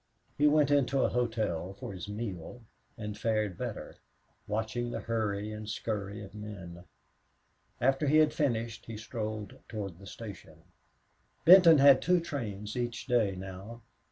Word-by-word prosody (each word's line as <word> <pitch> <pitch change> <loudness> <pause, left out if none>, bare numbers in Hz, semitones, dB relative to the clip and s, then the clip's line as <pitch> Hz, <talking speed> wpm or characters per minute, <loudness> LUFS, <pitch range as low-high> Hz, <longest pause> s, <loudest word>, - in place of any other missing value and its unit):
He 150 - +4
went 150 -1 +4
into 135 -1 +3
a - - +2
hotel 110 -7 -1
for 100 - -7
his 95 +2 -7
meal 105 0 -6 0.4
and 105 -2 -5
fared 110 -4 0
better, - - -6 0.5
watching 110 +3 -2
the - - -4
hurry 110 -2 -2
and 105 0 -7
scurry 105 -2 -4
of 95 - -12
men. 95 -5 -9 0.9
After 135 +4 +2
he 150 +3 +5
had 155 -1 +5
finished 115 -6 -1
he 115 -1 -6
strolled 110 -2 -5
toward 100 -6 -5
the 100 - -12
station. 95 -8 -10 0.8
Benton 175 -2 +9
had 140 -1 +7
two 180 +2 +3
trains 110 -10 -5
each 120 -2 -3
day 115 -7 +2
now. 95 +5 -8
110 Hz, 145 wpm, -30 LUFS, 100-125 Hz, 0.9 s, Benton